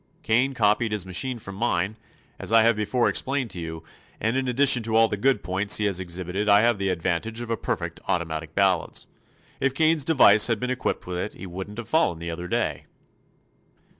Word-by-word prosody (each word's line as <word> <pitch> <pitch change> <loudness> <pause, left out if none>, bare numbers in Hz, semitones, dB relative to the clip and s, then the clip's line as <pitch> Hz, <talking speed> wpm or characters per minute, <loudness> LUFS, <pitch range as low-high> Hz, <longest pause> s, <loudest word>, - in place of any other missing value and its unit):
Kane 125 +4 +1
copied 110 0 +2
his 105 -3 -2
machine 120 +8 -3
from 100 -3 -9
mine, 100 -2 -1 0.4
as - - -4
I 115 -1 +6
have 115 0 +4
before 110 +4 0
explained 130 -4 -1
to 90 - -4
you, 80 -1 -6 0.4
and 110 +3 0
in 130 -1 -1
addition 130 0 +3
to 110 0 -2
all 115 0 +6
the 105 - -2
good 125 +1 +1
points 95 +3 +1
he 105 - 0
has 100 -3 +1
exhibited 95 +3 -3
I 100 +1 +6
have 115 -2 +2
the 95 0 0
advantage 90 +6 -2
of 120 -1 -5
a - - +2
perfect - - -4
automatic 80 -3 -3
balance. 95 -3 +1 0.5
If 135 0 0
Kane's 160 0 +3
device 115 -9 +5
had 115 -3 0
been 125 +2 -2
equipped 130 - -2
with 90 -1 -4
it 105 - -4
he - - -9
wouldn't 95 +4 -7
have 115 -2 -6
fallen 135 - +2
the 85 +1 -5
other 85 +2 -6
day." - - -2
105 Hz, 205 wpm, -25 LUFS, 90-120 Hz, 0.5 s, I